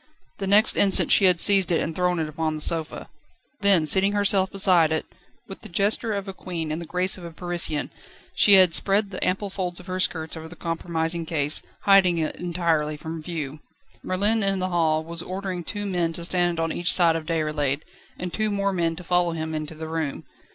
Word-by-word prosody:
The 195 - -3
next 205 +3 +5
instant 195 -1 +4
she 195 - +6
had 180 -2 +3
seized 195 -2 +4
it 165 - +2
and 165 - -4
thrown 180 -1 0
it 160 -1 -2
upon 155 +1 -3
the 155 - -6
sofa. 160 0 0 0.5
Then 195 -6 +4
seating 190 +6 +5
herself 200 -2 +2
beside 185 -5 +3
it, 160 - -2 0.4
with 195 - -10
the - - -11
gesture 205 +5 0
of 200 -1 -4
a 195 - -6
queen 170 -4 -6
and 160 +2 -4
the 170 - -8
grace 180 +2 0
of - - -12
a 170 - -7
Parisienne, 170 -3 -3 0.4
she 205 - +5
had 185 -3 +5
spread 200 +2 +2
the 185 - -5
ample 195 +2 -2
folds 180 -2 -4
of 180 - -13
her 185 0 -4
skirts 160 -3 -2
over 160 0 -8
the 175 - -12
compromising 165 0 -3
case, 150 -3 -1 0.2
hiding 195 -3 +4
it 160 -1 -2
entirely 165 -4 -1
from 160 +1 -7
view. 155 -3 -6 0.4
Merlin 205 +4 0
in 195 -1 0
the 185 0 -2
hall 160 -3 +1
was 165 +1 -3
ordering 185 0 -5
two 205 +4 -5
men 175 -4 -1
to 170 +1 -3
stand 175 -1 0
one 165 0 -1
on - - -5
each 175 +1 +2
side 170 -3 +4
of 160 -1 -5
Déroulède, 150 -4 -1 0.4
and 180 -1 -6
two 215 0 -1
more 200 -1 -1
to 170 -1 -2
follow 175 0 0
him 160 -1 -5
into 155 0 -5
the 160 +1 -7
room. 160 -3 -4
175 Hz, 215 wpm, -24 LUFS, 160-190 Hz, 0.5 s, she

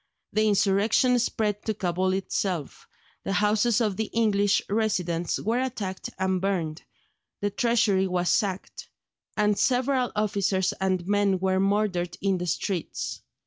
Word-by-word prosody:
The 215 +1 +2
insurrection 210 +5 +3
spread 210 -3 -1
to 220 - -1
Cabul 185 -1 0
itself; 190 -4 -3 0.4
the 195 - -2
houses 210 +3 +2
of 210 -5 0
the 220 - 0
English 205 -3 +2
residents 180 -6 0
were 230 +4 0
attacked 220 -8 -4
and 190 -1 0
burned, 175 -5 -1 0.6
the 205 0 -1
Treasury 205 -3 +2
was 180 -1 -1
sacked, 195 -2 -1 0.5
and 210 -1 +3
several 255 0 +1
officers 200 -3 +1
and 185 -2 0
men 200 -1 +2
were 190 0 +1
murdered 195 -3 0
in 195 -1 0
the 180 - -3
streets. 175 +1 -3
200 Hz, 135 wpm, -26 LUFS, 185-215 Hz, 0.6 s, insurrection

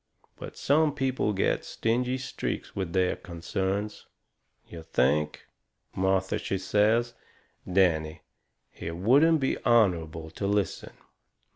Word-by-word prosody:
But - - -10
some 150 +1 +2
people 130 -6 0
get 95 - 0
stingy 125 +3 -1
streaks 130 0 -5
with 95 -4 -3
their 95 -1 +2
concerns. 95 +4 -4 0.6
You 85 - -9
think!" 75 0 0 0.5
Martha, 95 0 +1
she 95 - -2
says: 110 +5 +2 0.6
"Danny, 80 -5 +1 0.6
it 80 0 -5
wouldn't 145 - +4
be 135 - -1
honourable 85 -8 +2
to 100 - -3
listen." 100 -1 -1
95 Hz, 110 wpm, -27 LUFS, 85-120 Hz, 0.6 s, wouldn't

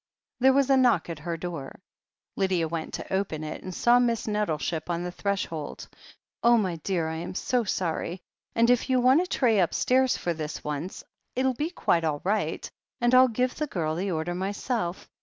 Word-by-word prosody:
There 265 +1 +5
was 275 0 +3
a 270 - +6
knock 235 -10 +3
at 160 - -6
her 165 +2 -4
door. 165 -5 -6 0.6
Lydia 185 -4 +1
went 160 0 -4
to - - -6
open 190 -5 -1
it, 155 - -5
and 185 - -6
saw 240 +6 +4
Miss 235 -2 +1
Nettleship 175 -6 -1
on 170 0 -1
the 180 - -4
threshold. 180 -6 -3 0.5
"Oh, 235 0 +6
my 185 -6 0
dear, 165 0 -1
I 160 0 -3
am 170 +3 -6
so 245 +4 +1
sorry, 180 -1 -2 0.4
and 230 +1 +4
if 245 +2 +1
you 255 -1 +3
want 260 +6 +5
a 365 - -3
tray 230 - +2
upstairs 255 +8 +2
for 175 - -1
this 155 -1 -5
once, 150 +5 -4 0.3
it'll 260 +1 +2
be 300 +6 -2
quite 170 - +1
all 150 -2 0
right, 205 +4 -1 0.3
and 240 +1 +2
rU 255 0 +7
give 250 +2 0
the 305 - -3
girl 160 - -2
the 185 +5 -2
order 170 0 -2
myself. 195 0 -3
190 Hz, 195 wpm, -27 LUFS, 165-245 Hz, 0.6 s, rU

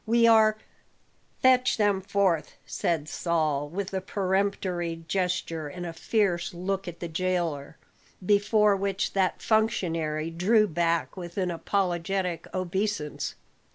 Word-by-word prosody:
We 230 +1 +4
are 220 -1 +5 0.4
" - - -39
"Fetch 255 -1 +4
them 205 -3 +2
forth," 195 -4 0
said 160 -3 -1
Saul, 155 -4 -1
with 195 +4 -4
a 190 - -1
peremptory 185 -3 -1
gesture 175 -4 -1
and 175 +4 -7
a 170 - -5
fierce 175 -2 0
look 195 +2 -3
at 175 -1 -7
the 170 - -3
jailer, 165 -4 -2 0.5
before 210 +1 +4
which 195 0 -1
that 190 -2 0
functionary 165 -8 0
drew 210 +6 +3
back 170 -1 0
with 175 -1 -8
an 185 -2 0
apologetic 180 -1 -1
obeisance. 185 -3 -2
185 Hz, 125 wpm, -27 LUFS, 170-200 Hz, 0.5 s, are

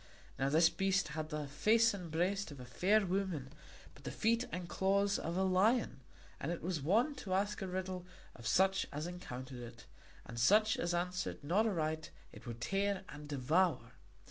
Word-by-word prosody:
Now 135 - +2
this 160 +3 +6
beast 195 0 +1
had 155 0 -4
the 150 -2 -3
face 220 +10 +3
and 180 -4 -6
breast 180 +4 0
of 145 -3 -10
a 125 - -8
fair 195 - +2
woman, 180 -8 -2 0.4
but - - -17
the - - -4
feet 230 +2 +1
and 180 -1 -4
claws 200 +2 +1
of 170 +2 -3
a 190 - +2
lion; 190 - +2 0.4
and - - -2
it 175 - -4
was 170 -3 -2
wont 230 - +2
to 185 -6 -2
ask 205 +2 0
a 190 - -2
riddle 185 -1 -4 0.3
of 115 -2 -7
such 190 +1 +3
as 150 +2 -4
encountered 130 -8 -7
it, 120 0 -10 0.4
and 115 - -7
such 215 - +5
as 175 0 0
answered 180 -2 -2
not 195 +10 +2
aright 160 -5 -1 0.2
it - - -13
would 115 0 -6
tear 195 +4 0
and 150 0 -9
devour. 145 -1 +1
180 Hz, 185 wpm, -35 LUFS, 150-195 Hz, 0.4 s, this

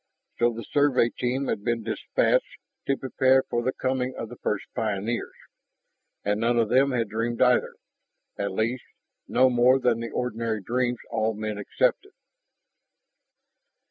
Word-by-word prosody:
So 120 0 +4
the 115 0 -7
Survey 140 -5 +3
team 130 +3 -2
had 100 - -2
been 115 0 -1
dispatched - - 0 0.3
to 135 - +1
prepare 130 0 +3
for 120 - -2
the 130 +2 0
coming 130 0 -2
of 115 - -5
the 120 - -9
first 105 - -2
pioneers, 110 0 -2 0.9
and 105 +1 0
none 120 +1 +2
of 115 -2 +2
them 135 +2 +4
had 120 -3 0
dreamed 115 +2 -2
either 125 -1 +3 0.6
at 100 - -2
least, 115 +6 -1 0.4
no 130 - +4
more 125 +1 +4
than 120 -3 +2
the 115 0 -4
ordinary 115 -2 -2
dreams 125 +2 0
all 110 0 0
men 105 -1 -4
accepted. 405 - 0
120 Hz, 145 wpm, -26 LUFS, 110-130 Hz, 0.9 s, So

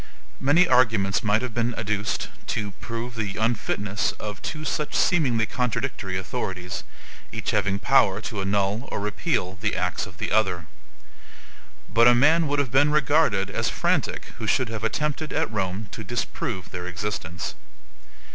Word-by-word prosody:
Many 165 +6 +4
arguments 110 -6 +3
might 110 +2 +2
have 125 -3 -4
been 120 0 0
adduced 105 -1 -1 0.2
to 105 -1 -2
prove 115 +2 -4
the 105 -4 -3
unfitness 105 -2 0
of 105 -1 -7
two 155 0 -4
such 150 0 -2
seemingly 125 -11 +3
contradictory 115 -5 -2
authorities, 90 -4 -4 0.5
each - - -2
having 100 -1 +1
power 105 -3 +4
to 105 -3 -4
ANNUL 100 +4 0
or - - -2
REPEAL 100 - -1
the - - 0
acts 90 +1 -1
of 90 -3 -14
the - - -3
other. 95 -6 +2 1.2
But 115 +1 +5
a 120 - +7
man 155 +6 +5
would 145 +1 0
have 140 -5 0
been 145 +3 +5
regarded 145 -9 +3
as - - 0
frantic - - 0
who 110 - -3
should 125 +2 +2
have 110 -1 -5
attempted 150 +6 -1
at - - 0
Rome 95 +1 -2
to 110 - -6
disprove 105 -4 -3
their 90 0 -5
existence. 90 -2 -4
110 Hz, 155 wpm, -25 LUFS, 100-125 Hz, 1.2 s, a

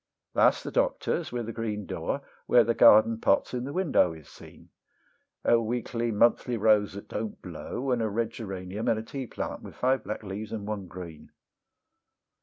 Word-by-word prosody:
That's - - +4
the - - -5
Doctor's - - 0
with 120 -2 -3
a 115 - -4
green 105 -3 -3
door, - - -3 0.3
where 120 - +6
the 115 +1 +1
garden 115 -1 +6
pots - - +2
in 125 0 -2
the 140 - -5
window 150 - +2
is 80 -2 -13
seen; - - -15 0.8
A 115 0 +5
weakly 120 +1 -2
monthly 120 +2 +2
rose 105 -2 +3
that 100 - -9
don't 110 0 -5
blow, 130 +2 -4
and 120 -2 +1
a 110 - 0
red 115 +2 -1
geranium, 95 -1 -5
and 110 - +3
a 110 - -4
teaplant 130 +1 -5
with - - -11
five 130 +1 +1
black 105 +1 -5
leaves, 105 +2 -6
and 105 -2 -4
one 105 -3 -4
green. 85 -4 -10
110 Hz, 180 wpm, -28 LUFS, 105-120 Hz, 0.8 s, where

